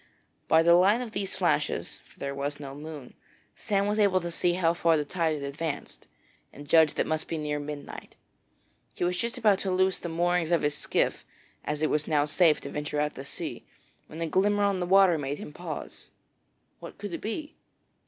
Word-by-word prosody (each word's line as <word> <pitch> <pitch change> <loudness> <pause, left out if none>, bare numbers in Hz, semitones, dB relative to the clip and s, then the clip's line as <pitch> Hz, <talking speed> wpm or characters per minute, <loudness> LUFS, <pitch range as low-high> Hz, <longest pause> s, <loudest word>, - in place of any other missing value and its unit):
By 160 0 +5
the 170 +1 +6
light 190 +6 +5
of 245 -3 -5
these 200 -2 -3
flashes - - 0
for - - -24
there 140 0 -4
was 145 +1 -3
no 140 -2 -7
moon 145 -2 -9 0.4
Sam 200 -1 0
was 210 +1 0
able 200 -3 +4
to 170 0 -4
see 175 +1 +1
how 170 -2 +2
far 170 -1 +3
the 150 - -1
tide 165 0 0
had 145 - -6
advanced, 145 +2 -5 0.4
and 145 +1 -12
judged 160 0 +5
it - - +2
must 155 0 -2
be 165 - -3
near 150 -1 -2
midnight. 145 0 -8 0.8
He - - -3
was 180 +1 +1
just 235 +7 -2
about 210 -5 +3
to 195 - -1
loose 185 0 +2
the 175 - -5
moorings 175 0 +1
of 170 -1 +2
his 145 0 +1
skiff, - - 0 0.4
as 150 +1 -3
it 155 - +2
was 150 0 0
now 150 -2 +2
safe 155 +1 +3
to - - -7
venture 150 0 -3
out 150 0 0
to 135 - -8
sea, 140 - -6 0.4
when 160 - -8
a 165 - 0
glimmer 205 +5 +2
on 200 -2 +1
the 180 - -2
water 190 -3 +5
made 140 0 -3
him 150 - -9
pause. 165 -2 -7 0.7
What - - -10
could 205 -2 -6
it - - -4
be? 295 +8 -5
165 Hz, 210 wpm, -28 LUFS, 150-185 Hz, 0.8 s, the